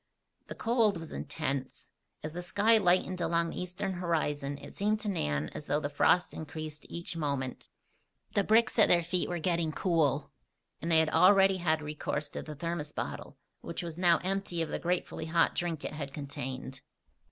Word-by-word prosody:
The -, -, -7 dB
cold 225 Hz, -4 st, +2 dB
was 165 Hz, -1 st, -8 dB
intense. 140 Hz, -4 st, -4 dB, 0.3 s
As 155 Hz, 0 st, -5 dB
the 175 Hz, -, -4 dB
sky 210 Hz, +5 st, +4 dB
lightened 185 Hz, -1 st, +2 dB
along 170 Hz, 0 st, +1 dB
the -, -, -4 dB
eastern 180 Hz, +2 st, -3 dB
horizon 150 Hz, -5 st, -1 dB
it -, -, -11 dB
seemed 210 Hz, +2 st, +1 dB
to 210 Hz, -, -4 dB
Nan 75 Hz, -, -1 dB
as 150 Hz, -, -8 dB
though 145 Hz, +2 st, +2 dB
the 145 Hz, -1 st, -3 dB
frost 175 Hz, +4 st, +3 dB
increased 155 Hz, -1 st, -7 dB
each 170 Hz, 0 st, -4 dB
moment. 140 Hz, -5 st, -3 dB, 0.6 s
The 200 Hz, -, +3 dB
bricks 225 Hz, +3 st, +3 dB
at 215 Hz, -, +7 dB
their 170 Hz, -1 st, +4 dB
feet 175 Hz, +2 st, 0 dB
were 175 Hz, -, -1 dB
getting 170 Hz, -1 st, 0 dB
cool; 155 Hz, -5 st, +1 dB, 0.5 s
and 165 Hz, -, -3 dB
they 165 Hz, -, +5 dB
had 160 Hz, -1 st, +4 dB
already 195 Hz, +3 st, +6 dB
had 160 Hz, -3 st, +1 dB
recourse 150 Hz, 0 st, -3 dB
to -, -, -5 dB
the 150 Hz, -, -8 dB
thermos 155 Hz, -1 st, -3 dB
bottle, -, -, -5 dB, 0.2 s
which -, -, -5 dB
was 170 Hz, 0 st, -6 dB
now 175 Hz, -2 st, +5 dB
empty 185 Hz, -3 st, -1 dB
of 160 Hz, -, -5 dB
the -, -, -2 dB
gratefully 175 Hz, -2 st, -2 dB
hot 165 Hz, +1 st, +3 dB
drink 170 Hz, -3 st, -2 dB
it -, -, -4 dB
had 140 Hz, -2 st, -6 dB
contained. 130 Hz, -2 st, -6 dB
165 Hz, 185 wpm, -31 LUFS, 150-180 Hz, 0.6 s, at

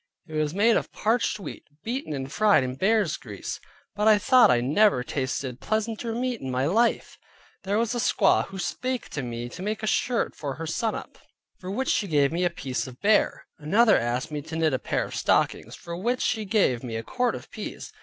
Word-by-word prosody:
It 155 Hz, -, -11 dB
was 155 Hz, +1 st, -1 dB
made 220 Hz, +3 st, +4 dB
of -, -, -3 dB
parched 225 Hz, 0 st, 0 dB
wheat, 195 Hz, -, -8 dB, 0.2 s
beaten, 250 Hz, -, -3 dB
and 135 Hz, -2 st, -4 dB
fried 210 Hz, -9 st, +4 dB
in 125 Hz, 0 st, -3 dB
bear's 195 Hz, +2 st, +1 dB
grease, 105 Hz, -5 st, -7 dB, 0.4 s
but 210 Hz, +1 st, +1 dB
I 215 Hz, -1 st, +7 dB
thought 250 Hz, +5 st, +5 dB
I 125 Hz, -1 st, +4 dB
never 140 Hz, -, +3 dB
tasted 130 Hz, -1 st, -3 dB
pleasanter 225 Hz, +1 st, -2 dB
meat 250 Hz, -1 st, -2 dB
in 130 Hz, -, -4 dB
my 130 Hz, +1 st, 0 dB
life. 225 Hz, +9 st, +1 dB, 0.5 s
There 200 Hz, +2 st, +1 dB
was 230 Hz, +1 st, 0 dB
a 240 Hz, -, -2 dB
squaw 245 Hz, -, +3 dB
who 195 Hz, -, -9 dB
spake 255 Hz, +6 st, -3 dB
to 145 Hz, -, -4 dB
me 120 Hz, -1 st, -5 dB
to 180 Hz, -, -9 dB
make 215 Hz, +3 st, -3 dB
a -, -, +1 dB
shirt 235 Hz, +2 st, 0 dB
for 140 Hz, -3 st, -4 dB
her 165 Hz, -, -6 dB
sannup, 220 Hz, +7 st, -3 dB, 0.4 s
for 185 Hz, -, -7 dB
which 260 Hz, +7 st, -2 dB
she 205 Hz, -, +1 dB
gave 145 Hz, -4 st, +3 dB
me 170 Hz, +2 st, -1 dB
a 175 Hz, -, +3 dB
piece 135 Hz, -6 st, -4 dB
of 125 Hz, -1 st, -11 dB
bear. 210 Hz, +1 st, +2 dB
Another 205 Hz, +9 st, +4 dB
asked 125 Hz, +6 st, -1 dB
me 150 Hz, -1 st, -3 dB
to 160 Hz, +3 st, -8 dB
knit 160 Hz, -3 st, +1 dB
a 130 Hz, -, 0 dB
pair -, -, -1 dB
of -, -, -9 dB
stockings, -, -, +1 dB
for 170 Hz, -, -7 dB
which 240 Hz, +8 st, -1 dB
she 220 Hz, -3 st, 0 dB
gave 190 Hz, -, +2 dB
me 115 Hz, -3 st, -5 dB
a 110 Hz, -, -3 dB
quart 250 Hz, -, 0 dB
of -, -, -10 dB
peas. 440 Hz, -, -7 dB
185 Hz, 215 wpm, -26 LUFS, 135-220 Hz, 0.5 s, I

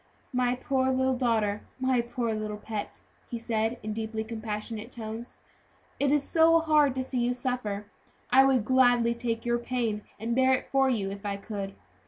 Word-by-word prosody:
"My 250 Hz, 0 st, +2 dB
poor 260 Hz, +1 st, 0 dB
little 260 Hz, 0 st, +2 dB
daughter! 220 Hz, -5 st, +1 dB, 0.2 s
my 260 Hz, -2 st, +2 dB
poor 235 Hz, -1 st, -2 dB
little 215 Hz, -1 st, -3 dB
pet!" 210 Hz, -1 st, -6 dB, 0.3 s
he 235 Hz, -, -3 dB
said, 225 Hz, 0 st, -1 dB
in 215 Hz, -, -3 dB
a -, -, -2 dB
deeply 220 Hz, 0 st, -3 dB
compassionate 220 Hz, 0 st, -5 dB
tone, 225 Hz, 0 st, -6 dB, 0.8 s
"it 280 Hz, -1 st, +2 dB
is 295 Hz, -1 st, +3 dB
so 330 Hz, 0 st, +5 dB
hard 300 Hz, -4 st, +3 dB
to 260 Hz, -, -1 dB
see 255 Hz, -1 st, -2 dB
you 240 Hz, +1 st, +1 dB
suffer; 245 Hz, -6 st, -2 dB, 0.5 s
I 265 Hz, +2 st, +8 dB
would 260 Hz, -5 st, +3 dB
gladly 245 Hz, -2 st, +4 dB
take 235 Hz, -1 st, -3 dB
your 240 Hz, 0 st, +1 dB
pain 235 Hz, -4 st, -1 dB, 0.2 s
and 230 Hz, +2 st, -1 dB
bear 260 Hz, 0 st, +5 dB
it -, -, -6 dB
for 270 Hz, -1 st, +4 dB
you 200 Hz, -6 st, 0 dB
if 200 Hz, 0 st, -8 dB
I 200 Hz, -1 st, -2 dB
could." 200 Hz, -1 st, -6 dB
235 Hz, 185 wpm, -28 LUFS, 220-260 Hz, 0.8 s, I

